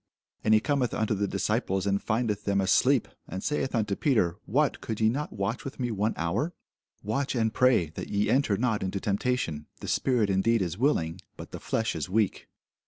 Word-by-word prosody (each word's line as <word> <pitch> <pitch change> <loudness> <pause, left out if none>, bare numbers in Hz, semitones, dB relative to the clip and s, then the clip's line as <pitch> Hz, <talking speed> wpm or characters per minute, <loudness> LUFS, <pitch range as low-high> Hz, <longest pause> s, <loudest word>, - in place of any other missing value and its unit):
And 110 0 +5
he - - +6
cometh 135 -1 0
unto 110 0 0
the 100 0 0
disciples, 95 0 -1
and 100 0 +1
findeth 110 -2 -1
them 100 -1 +1
asleep, 95 - +3 0.2
and 95 +2 -5
saith 135 -3 -1
unto 105 -3 0
Peter, 100 - +2
What, 145 +6 +1
could 110 -2 -4
ye 110 0 +4
not 145 +6 -2
watch 100 +4 -3
with 135 - -7
me 120 -2 -1
one 105 +1 0
hour? 85 - -1 0.5
Watch 130 +7 -1
and 110 -2 +1
pray, 125 -12 +3
that - - -7
ye 100 0 +1
enter 130 -7 +2
not 110 -2 0
into 95 +1 -2
temptation: 100 -8 -1
the - - -7
spirit 120 -6 +2
indeed 100 +3 +2
is 85 -2 -3
willing, 95 - 0 0.2
but - - -9
the - - -6
flesh 115 0 -1
is - - -3
weak. 105 0 0
110 Hz, 195 wpm, -28 LUFS, 95-125 Hz, 0.5 s, he